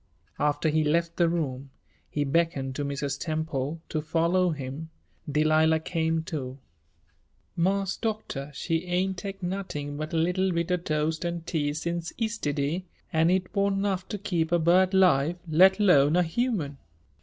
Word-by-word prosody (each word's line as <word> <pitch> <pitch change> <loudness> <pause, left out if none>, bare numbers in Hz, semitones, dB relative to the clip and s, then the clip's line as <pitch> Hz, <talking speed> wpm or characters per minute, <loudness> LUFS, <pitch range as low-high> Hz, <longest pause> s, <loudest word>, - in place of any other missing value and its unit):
After 150 +2 +1
he 155 +1 +2
left 165 +3 0
the 170 -2 +4
room, 140 -5 -2 0.4
he 145 - -1
beckoned 140 -3 0
to 145 - -2
Mrs. 140 0 -3
Temple 155 -2 -2
to 155 - -1
follow 170 +4 +2
him. 145 +1 -5 0.4
Delilah 155 +2 +3
came, 160 -1 -1
too. 135 -5 -5 1.0
"Marse 195 +2 0
Doctor, 215 - -3
she 165 +4 -2
ain' 180 +2 0
tech 195 +1 -7
nuttin' 175 -6 -4
but 155 +1 -4
a 165 - -1
leetle 180 +3 +1
bit 170 +1 -1
o' 180 - +3
toast 155 -1 -1
an' 170 -1 -2
tea 155 -3 -1
since 170 +2 -3
yistiddy, 165 -8 -1 0.3
an' 160 +1 +4
it 185 0 0
wan' 200 0 +2
'nough 195 -2 -1
to 210 - -4
keep 175 -5 -1
a 175 - +4
bird 180 +3 +4
'live, 175 -3 +4
let 190 +5 +5
'lone 155 -7 +5
a 180 - +4
human." 165 - -1
165 Hz, 155 wpm, -27 LUFS, 150-185 Hz, 1.0 s, let